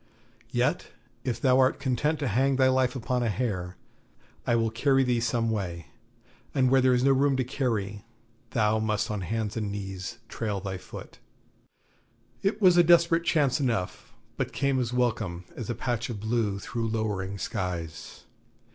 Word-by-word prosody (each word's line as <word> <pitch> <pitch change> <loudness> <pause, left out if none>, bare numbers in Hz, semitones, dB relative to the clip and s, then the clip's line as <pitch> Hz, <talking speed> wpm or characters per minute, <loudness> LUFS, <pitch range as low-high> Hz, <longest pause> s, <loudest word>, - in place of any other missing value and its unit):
Yet, 120 +1 0 0.4
if 120 -3 -2
thou 130 +1 +4
art 130 +1 +3
content 140 +3 0
to 145 - -2
hang 130 +5 +2
thy 130 0 +4
life 130 0 +2
upon 125 0 -1
a 120 - +1
hair, 95 -5 -2 0.7
I 120 - +3
will 115 -1 +1
carry 135 +3 +3
thee 125 -2 +1
some 115 0 0
way; 90 -6 -4 0.6
and 130 -2 +3
where 135 0 +5
there 130 0 +4
is 125 - +1
no 135 - +5
room 135 0 +3
to 130 - +1
carry, 110 -6 -2 0.5
thou 110 -1 +2
must 110 0 0
down 105 -2 -2
on 90 - -5
hands 110 -2 -2
and 105 -2 -2
knees 95 -2 -5
and - - -35
trail 105 -3 -2
thy 95 -1 -5
foot.' 90 - -11 1.2
It 200 +2 0
was 185 -4 +6
a 175 - +8
desperate 170 0 +4
chance 145 -6 +2
enough, 115 -2 -2 0.3
but 130 -2 -2
came 140 -2 +1
as 120 -2 -1
welcome 110 -8 -1
as 115 - -6
a 120 - -1
patch 120 0 -2
of 110 -4 -4
blue 110 -2 0
through 115 +2 -3
lowering 105 -3 -2
skies. 90 -7 -5
120 Hz, 175 wpm, -27 LUFS, 105-130 Hz, 1.2 s, a